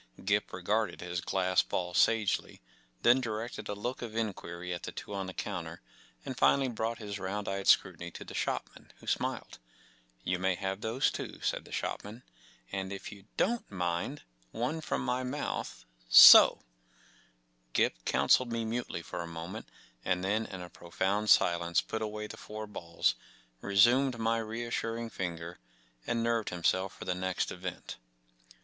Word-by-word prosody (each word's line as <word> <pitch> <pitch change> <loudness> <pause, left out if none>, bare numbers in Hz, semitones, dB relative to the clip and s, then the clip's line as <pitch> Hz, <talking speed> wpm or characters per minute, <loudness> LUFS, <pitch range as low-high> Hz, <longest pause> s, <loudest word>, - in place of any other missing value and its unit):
Gip 105 +1 +1
regarded 100 +2 -1
his 90 0 -3
glass 90 -1 +2
ball 90 -1 -3
sagely, 110 +1 +2 0.4
then 125 +2 +6
directed 115 0 -4
a 105 - -2
look 120 +5 -4
of 115 -2 -6
inquiry 90 -5 -3
at 85 - -5
the - - -6
two 105 - -8
on 95 -1 -3
the - - -5
counter, 85 -4 -5 0.5
and 130 - -4
finally 135 +1 +3
brought 115 0 -2
his 100 -2 -6
round 100 +2 -3
eyed 95 0 -3
scrutiny 85 - +3
to - - -10
the - - -9
shop¬ - - -1
man, - - -17
who - - -16
smiled. - - -2 0.6
“You 90 +4 -1
may 95 0 +1
have 95 +2 -3
those 115 +4 +1
too," - - -6
said - - -1
the - - -14
shop¬ - - -3
man, 110 +5 -10 0.5
4 95 - -2
‘and, 95 0 -5
if 100 - -6
you 100 -2 -13
don't 235 +3 0
mind, 85 -3 -2 0.3
one 125 - -2
from - - -2
my 125 +1 0
mouth. 135 +3 -4 0.2
So - - +11
f - - -19
n - - -29 1.1
Gip - - +1
counselled 125 - +3
me 115 -1 -1
mutely 115 -6 -3
for - - -5
a 85 - -6
moment, 85 +6 -7 0.3
and 90 0 0
then 110 +3 0
in 95 -2 -7
a 90 - -9
pro 85 - -14
found 100 +5 0
silence 85 0 +4
put 110 - -3
away 105 0 -3
the - - -9
four 110 0 -7
balls, 85 -5 -1 0.5
re¬ 100 0 -3
sumed 125 +4 +5
my 115 0 +1
reassuring 115 0 -3
finger, 85 -1 -5 0.5
and 115 -1 0
nerved 115 -2 0
himself 95 +2 0
for - - -8
the 90 - 0
next 95 0 -2
event. 90 0 -6
100 Hz, 175 wpm, -31 LUFS, 90-115 Hz, 1.1 s, So